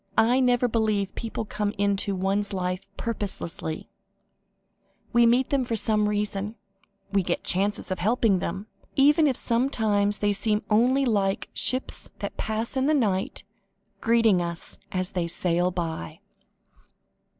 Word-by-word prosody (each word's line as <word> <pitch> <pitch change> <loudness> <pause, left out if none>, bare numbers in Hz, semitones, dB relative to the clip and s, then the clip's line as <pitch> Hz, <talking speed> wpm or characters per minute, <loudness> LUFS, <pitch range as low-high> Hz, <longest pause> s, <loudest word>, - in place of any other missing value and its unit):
"I 240 +4 +4
never 245 -1 +3
believe 215 -4 0
people 225 -1 -4
come 210 0 -3
into 200 0 +1
one's 195 +2 -1
life 185 0 -3
purposelessly: 195 -7 -4 1.3
we 235 0 +5
meet 245 +2 +2
them 275 -2 +2
for 235 -2 -2
some 210 -1 +2
reason, 205 -1 -1
and 215 +2 -8 0.6
we 195 - +5
get 175 -1 -2
chances 195 +1 -1
of 185 - -2
helping 215 0 +2
them 190 +4 -4 0.3
even 295 +3 +5
if 265 - +1
sometimes 220 -5 +2
they 205 0 +1
seem 210 +1 0
only 255 +6 +3
like 200 -5 0
'ships 255 +1 0
that - - -5
pass 220 +3 -3
in 265 +1 +1
the 310 - +3
night,' 200 -8 0 0.6
greeting 225 -5 +3
us 170 -1 -5
as 185 -1 0
they 175 -2 -1
sail 175 +1 +1
by." 165 - -4
210 Hz, 140 wpm, -26 LUFS, 190-235 Hz, 1.3 s, we